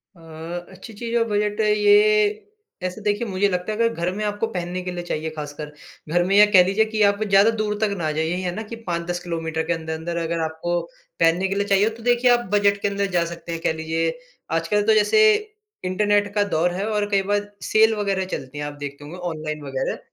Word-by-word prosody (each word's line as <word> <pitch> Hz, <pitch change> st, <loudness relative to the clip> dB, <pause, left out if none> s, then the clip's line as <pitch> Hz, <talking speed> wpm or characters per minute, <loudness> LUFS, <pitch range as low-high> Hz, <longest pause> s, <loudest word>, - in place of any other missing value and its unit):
अ, -, -, -19 dB, 0.5 s
अच्छी 220 Hz, +4 st, -11 dB
चीज़ 230 Hz, +2 st, -4 dB
और 230 Hz, -, +3 dB
बजट 210 Hz, 0 st, -1 dB
अ, -, -, +2 dB
ये, 210 Hz, 0 st, +4 dB, 0.4 s
ऐसे 185 Hz, +4 st, -4 dB
देखिए 210 Hz, +2 st, -1 dB
मुझे 195 Hz, 0 st, +1 dB
लगता 180 Hz, +2 st, -2 dB
है 215 Hz, -, -3 dB
अगर 230 Hz, 0 st, +2 dB
घर 170 Hz, -1 st, -2 dB
में 210 Hz, -, -3 dB
आपको 210 Hz, +2 st, -1 dB
पहनने 180 Hz, -3 st, -4 dB
के 180 Hz, 0 st, -5 dB
लिए 175 Hz, -1 st, -5 dB
चाहिए 160 Hz, -2 st, -3 dB
खासकर, 150 Hz, 0 st, -6 dB, 0.4 s
घर 175 Hz, +2 st, +2 dB
में 195 Hz, +2 st, +1 dB
या 210 Hz, -, +9 dB
कह 185 Hz, -3 st, +8 dB
लीजिए 200 Hz, +4 st, +2 dB
कि 220 Hz, 0 st, -3 dB
आप 200 Hz, +1 st, +3 dB
ज़्यादा 200 Hz, +1 st, +5 dB
दूर 210 Hz, -1 st, 0 dB
तक 210 Hz, -2 st, +1 dB
ना 155 Hz, -3 st, -1 dB
जाइए 160 Hz, +1 st, -1 dB
यही 180 Hz, +1 st, -2 dB
है 180 Hz, -1 st, -2 dB
ना 220 Hz, -, -4 dB
कि -, -, -3 dB
5-10 170 Hz, +1 st, -2 dB
किलोमीटर 165 Hz, -2 st, -3 dB
के -, -, +2 dB
अंदर-अंदर 160 Hz, +1 st, -4 dB
अगर 165 Hz, +1 st, -2 dB
आपको 160 Hz, +2 st, -2 dB, 0.4 s
पहनने 170 Hz, +3 st, +3 dB
के 195 Hz, -, -2 dB
लिए 200 Hz, 0 st, 0 dB
चाहिए, 200 Hz, +1 st, +3 dB
तो 225 Hz, 0 st, -11 dB
देखिए 245 Hz, +1 st, +3 dB
आप 240 Hz, 0 st, +2 dB
बजट 205 Hz, -1 st, +3 dB
के -, -, +1 dB
अंदर 200 Hz, 0 st, -1 dB
जा 170 Hz, -, +3 dB
सकते 170 Hz, 0 st, -8 dB
हैं। 165 Hz, 0 st, -4 dB
कह -, -, +1 dB
लीजिए, 160 Hz, +1 st, -1 dB, 0.4 s
आजकल 165 Hz, +6 st, +1 dB
तो 220 Hz, -, +6 dB
जैसे 215 Hz, -, +4 dB, 0.6 s
इंटरनेट 205 Hz, +2 st, +1 dB
का 205 Hz, -, +3 dB
दौर 170 Hz, +3 st, +2 dB
है 190 Hz, +3 st, -2 dB
और 210 Hz, -1 st, 0 dB
कई 200 Hz, -1 st, +2 dB
बार 205 Hz, 0 st, -1 dB
सेल 220 Hz, +1 st, +4 dB
वगैरह 200 Hz, -2 st, -1 dB
चलती 130 Hz, +2 st, -9 dB
हैं 145 Hz, -, -3 dB
आप 145 Hz, -, -5 dB
देखते 140 Hz, 0 st, -7 dB
होंगे, 155 Hz, +5 st, -9 dB
ऑनलाइन 155 Hz, -4 st, -4 dB
वगैरह। 135 Hz, -1 st, -3 dB
190 Hz, 230 wpm, -22 LUFS, 165-210 Hz, 0.6 s, या